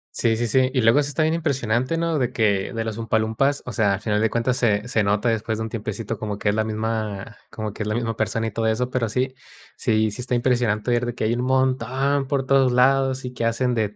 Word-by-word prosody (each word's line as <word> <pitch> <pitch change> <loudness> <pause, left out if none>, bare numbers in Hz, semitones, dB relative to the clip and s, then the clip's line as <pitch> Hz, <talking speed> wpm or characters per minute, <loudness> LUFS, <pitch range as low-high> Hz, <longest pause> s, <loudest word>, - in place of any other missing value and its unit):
Sí, 115 -1 +2
sí, 120 +1 -1
sí. 130 +3 +3
Y 130 - +3
luego 115 +5 +5
eso 145 -1 +1
está 155 - 0
bien 155 +1 +2
impresionante, 130 -3 0
¿no? 165 -2 0
De 125 -1 0
que 100 -4 +1
de 115 -1 -3
las 110 -1 -4
Umpa 115 -1 0
Lumpas, 115 +6 0
o 125 - -5
sea, 105 -3 +2
a 100 - -4
final 105 0 0
de 110 - +2
cuentas 120 +2 0
se 105 -1 +1
se 110 -4 +1
nota 105 +4 +1
después 110 -1 -1
de - - -2
un - - -4
tiempecito 110 -1 -4
como 105 -2 -4
que 105 - -1
es 105 - +2
la 110 0 +1
misma 110 -1 -3
como 110 -1 -5
que 105 - -6
es - - -7
la 105 - -1
misma 115 -1 -2
persona, 110 +1 -1
y - - -4
todo 110 +2 -2
eso, 125 +3 0
pero 120 -3 0
sí, 130 +4 -1 0.4
sí, 110 -1 +1
sí 125 - -6
está 125 0 -2
impresionante 120 -2 +1
ver 120 0 +2
de 120 - -3
que - - -3
hay 115 +2 +1
un 120 - -2
montón 130 +1 +1
por 135 -1 -1
todos 135 -2 +4
lados, 130 +1 +3
y 125 - -5
que 115 - -3
hacen 120 +2 +1
de 110 -3 +1
115 Hz, 265 wpm, -23 LUFS, 110-130 Hz, 0.4 s, luego